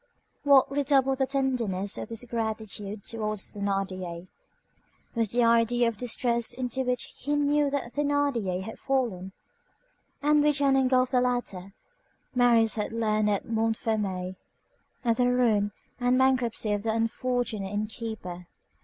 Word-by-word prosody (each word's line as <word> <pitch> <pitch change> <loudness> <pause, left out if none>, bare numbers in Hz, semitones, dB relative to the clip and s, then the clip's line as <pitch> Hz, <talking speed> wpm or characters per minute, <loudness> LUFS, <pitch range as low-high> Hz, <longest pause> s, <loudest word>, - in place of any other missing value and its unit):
What 280 -2 +5
redoubled 275 -1 +2
the 265 - +2
tenderness 240 -8 0
of - - -5
his 230 +1 -4
gratitude 220 -3 -4
towards 215 -3 -3
Thénardier, 185 -3 -3 0.9
was 230 -3 0
the 245 0 +3
idea 235 +1 +3
of - - -5
the 205 - -21
distress 235 -1 0
into 255 0 -2
which 250 -1 -2
he 290 +2 -1
knew 290 0 +2
that 275 -4 -3
Thénardier 280 -11 0
had 220 +3 -8
fallen, 230 -9 -1 0.9
and 295 0 +3
which 295 -1 +3
had 280 -1 +3
engulfed 255 -1 +3
the 250 - +3
latter. 225 -7 -2 0.6
Marius 235 -3 +4
had 210 - -2
learned 215 -2 +1
at 200 -1 0
Montfermeil 220 -5 -1 0.7
of 230 -1 +2
the 250 -1 +3
ruin 220 -5 +2 0.3
and 245 +1 +2
bankruptcy 255 -4 +2
of 205 - -1
the 220 +1 -1
unfortunate 230 -2 -1
inn 210 +1 -1
keeper. 215 -6 -7
230 Hz, 140 wpm, -27 LUFS, 210-255 Hz, 0.9 s, What